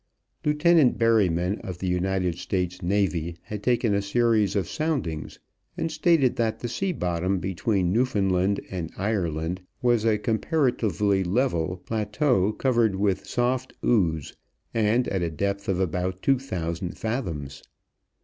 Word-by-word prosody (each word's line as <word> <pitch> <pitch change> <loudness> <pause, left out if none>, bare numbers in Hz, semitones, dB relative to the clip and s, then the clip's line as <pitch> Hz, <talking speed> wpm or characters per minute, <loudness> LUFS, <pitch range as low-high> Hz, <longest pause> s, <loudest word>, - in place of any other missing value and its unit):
Lieutenant 150 -2 +4
Berryman 100 -5 +2
of 90 -2 -6
the 95 - -5
United 90 -1 0
States 90 -1 -2
Navy 85 -3 0
had 105 -1 -6
taken 120 -1 +2
a 100 - +2
series 110 -1 +2
of 95 -4 0
soundings 140 - -2 0.4
and 165 - -2
stated 155 -5 +3
that 115 -2 0
the 120 - -3
sea 190 +11 -1
bottom 90 - -1
between 95 0 0
Newfoundland 100 -5 +1
and 85 -4 -4
Ireland 90 -4 -1 0.2
was 120 -3 +2
a 110 -2 +3
comparatively 110 - +1
level 90 -4 0
plateau 110 -1 +1
covered 115 -3 +1
with 95 -1 0
soft 125 +1 -1
ooze, 80 - +1 0.4
and 115 +2 +2
at 95 - -1
a 85 - 0
depth 100 +5 -2
of 95 -1 +1
about 90 +1 -2
two 135 -2 +3
thousand 85 -8 -4
fathoms. 80 - -4
100 Hz, 135 wpm, -25 LUFS, 90-120 Hz, 0.4 s, Lieutenant